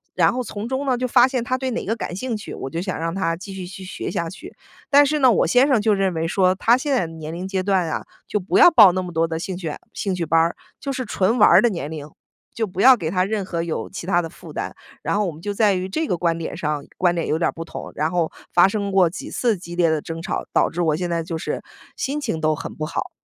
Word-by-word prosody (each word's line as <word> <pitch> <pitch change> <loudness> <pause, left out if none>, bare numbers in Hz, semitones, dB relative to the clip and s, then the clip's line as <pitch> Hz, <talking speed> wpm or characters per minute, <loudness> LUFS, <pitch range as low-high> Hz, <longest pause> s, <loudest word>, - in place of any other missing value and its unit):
然 - - +3
后 255 - -2
从 215 -1 -6
中 265 +2 -2
呢， 255 -2 +1
就 255 +1 -1
发 250 +1 +5
现 255 -2 -1
他 255 +1 0
对 260 -1 -3
哪 240 - -3
个 225 - 0
感 200 - -5
兴 230 +5 -3
趣， 210 - -7
我 135 - -6
就 165 +5 -3
想 185 0 -3
让 165 +1 -2
他 165 -4 0
继 195 +2 -9
续 190 -1 -6
去 190 +1 -9
学 - - -5
下 170 -1 -2
去。 185 - -11 0.4
但 290 0 +7
是 300 +2 0
呢， 260 -3 +6
我 205 - +2
先 250 +10 +5
生 260 -5 +4
就 215 0 +2
认 195 -2 +1
为 165 0 -1
说 185 +1 +3
他 230 +5 +4
现 285 +3 -3
在 215 -10 +1
的 165 - -10
年 160 -1 -7
龄 180 +2 -5
阶 190 -1 -1
段 190 -3 +1
啊， - - -3 0.2
就 - - -1
不 195 -1 0
要 - - +9
报 215 - +8
那 185 +1 -1
么 180 -1 -7
多 165 0 +2
的 160 -1 -3
兴 185 +2 -4
趣 170 -4 -4 0.2
兴 195 - -2
趣 175 -2 -2
班 165 +1 +2
儿， 165 +1 +2 0.2
就 280 - -3
是 255 -1 -3
纯 200 +2 +1
玩 210 - +7
儿 - - +7
的 240 - +4
年 170 -8 -4
龄。 155 -2 -7 0.4
就 225 -2 -2
不 185 +1 -4
要 260 +2 +8
给 160 -7 -3
他 185 +1 +1
任 200 0 -2
何 170 -3 -3
有 165 -2 -4
其 - - -7
他 175 -1 +2
的 165 - -6
负 - - -13
担， - - -5 0.3
然 - - -1
后 210 0 +1
我 180 - -2
们 155 +1 -13
就 205 +3 -3
在 205 -1 +3
于 185 0 -2
这 315 +12 -2
个 180 - 0
观 170 -1 0
点 165 - -5
上， 150 -2 -2
观 175 -1 +2
点 170 - -1
有 155 - +1
点 165 - +2
儿 - - 0
不 165 - -6
同， 165 - -8
然 155 +2 0
后 175 -3 0 0.2
发 175 +2 +6
生 200 0 -2
过 190 -3 +4
几 165 - -8
次 235 -3 +1
激 170 -1 -9
烈 170 -2 +4
的 155 -2 0
争 165 0 -6
吵， - - -3
导 - - +3
致 175 - -3
我 160 -2 +2
现 175 +1 -3
在 170 -1 -1
就 165 0 -4
是 - - -4 0.3
心 280 +3 -2
情 220 - -3
都 155 0 +2
很 - - -7
不 155 - -3
好。 - - -3
185 Hz, 320 characters per minute, -22 LUFS, 165-220 Hz, 0.4 s, 要